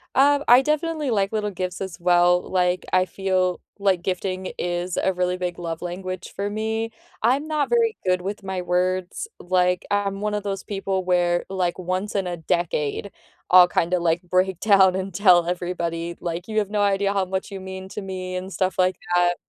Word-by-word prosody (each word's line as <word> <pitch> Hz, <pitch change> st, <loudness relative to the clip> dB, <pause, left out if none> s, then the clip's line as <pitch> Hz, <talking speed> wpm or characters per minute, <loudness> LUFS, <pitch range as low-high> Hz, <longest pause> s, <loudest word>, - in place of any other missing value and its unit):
Um, 285 Hz, +1 st, +4 dB
I 245 Hz, +2 st, +8 dB
definitely 305 Hz, 0 st, -1 dB
like 200 Hz, -3 st, +1 dB
little 210 Hz, -1 st, -1 dB
gifts 185 Hz, 0 st, -4 dB
as 190 Hz, -3 st, -5 dB
well, 175 Hz, 0 st, +4 dB
like, 180 Hz, -1 st, +1 dB
I 185 Hz, 0 st, +4 dB
feel 185 Hz, -1 st, 0 dB, 0.2 s
like 190 Hz, -3 st, +1 dB
gifting 185 Hz, 0 st, -2 dB
is 175 Hz, 0 st, -2 dB
a 190 Hz, -, +1 dB
really 180 Hz, 0 st, 0 dB
big 180 Hz, -1 st, -3 dB
love 165 Hz, -2 st, -5 dB
language 185 Hz, +1 st, -6 dB
for 200 Hz, +1 st, -2 dB
me, 220 Hz, +2 st, -2 dB, 0.3 s
I'm 270 Hz, +7 st, +2 dB
not 305 Hz, -2 st, 0 dB
very 460 Hz, -2 st, +2 dB
good 180 Hz, -1 st, +2 dB
with 200 Hz, +3 st, -5 dB
my 190 Hz, -1 st, -3 dB
words, 180 Hz, -, -1 dB
like, 180 Hz, 0 st, +1 dB
I'm 200 Hz, -1 st, 0 dB
one 210 Hz, 0 st, -2 dB
of 210 Hz, -1 st, -2 dB
those 195 Hz, -2 st, -3 dB
people 195 Hz, -2 st, -2 dB
where, 175 Hz, -1 st, +2 dB
like, 185 Hz, -2 st, -1 dB
once 185 Hz, +3 st, -2 dB
in 195 Hz, -3 st, -1 dB
a 175 Hz, -, -2 dB
decade, 170 Hz, +2 st, -1 dB, 0.4 s
I'll 180 Hz, -1 st, +8 dB
kinda, 180 Hz, +1 st, +1 dB
like, 170 Hz, 0 st, +1 dB
break 185 Hz, 0 st, +1 dB
down 195 Hz, -3 st, +5 dB
and 190 Hz, 0 st, -3 dB
tell 180 Hz, -3 st, +5 dB
everybody, 170 Hz, -1 st, -3 dB
like, 175 Hz, +1 st, -4 dB
"You 215 Hz, -1 st, 0 dB
have 205 Hz, -, -2 dB
no 210 Hz, 0 st, 0 dB
idea 200 Hz, 0 st, +2 dB
how 195 Hz, -1 st, +1 dB
much 190 Hz, +1 st, -3 dB
you 195 Hz, -2 st, -6 dB
mean 190 Hz, 0 st, -7 dB
to 210 Hz, -, -6 dB
me" 185 Hz, -1 st, -5 dB
and 185 Hz, +1 st, -5 dB
stuff 185 Hz, +2 st, -1 dB
like 185 Hz, 0 st, +2 dB, 0.2 s
that, 175 Hz, 0 st, +3 dB
185 Hz, 195 wpm, -23 LUFS, 180-200 Hz, 0.4 s, I